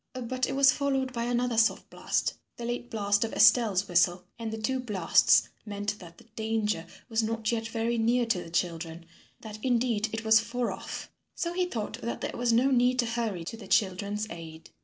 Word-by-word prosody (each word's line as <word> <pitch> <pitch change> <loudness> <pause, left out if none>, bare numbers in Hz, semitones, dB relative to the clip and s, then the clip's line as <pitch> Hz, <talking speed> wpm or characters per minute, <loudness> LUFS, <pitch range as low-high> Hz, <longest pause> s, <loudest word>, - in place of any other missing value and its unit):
But 255 +1 -2
it - - -2
was 275 -1 +6
followed 270 -2 -1
by 235 -1 -2
another 245 -1 +1
soft 225 - +1
blast - - -1 0.2
the 235 - -5
late 240 0 -4
blast 205 -3 +1
of 225 - -4
Estelle's 205 -5 +5
whistle 175 0 +2 0.2
and 225 -1 -4
the 220 - -4
two 260 +4 -1
blasts 210 -9 +3
meant 205 0 -4
that 170 -2 -13
the - - -16
danger 215 -6 -1 0.2
was 225 -2 +1
not 225 0 -1
yet 225 -1 -2
very 230 +1 -1
near 240 +2 +2
to 210 -6 0
the - - -11
children, 165 -1 -3 0.4
that 215 -1 -8
indeed 235 -3 +1
it 225 0 -4
was 220 0 +6
far 235 +2 -2
off, - - -7 0.2
so 340 0 -2
he 365 0 +1
thought 225 -4 -5
that 235 - -4
there - - -3
was 240 0 +1
no 250 +4 +3
need 250 0 +3
to 245 - +2
hurry 230 -6 -2
to 185 - -6
the 220 -4 -11
children's 200 +1 +1
aid. 165 -1 -10
225 Hz, 200 wpm, -28 LUFS, 205-240 Hz, 0.4 s, was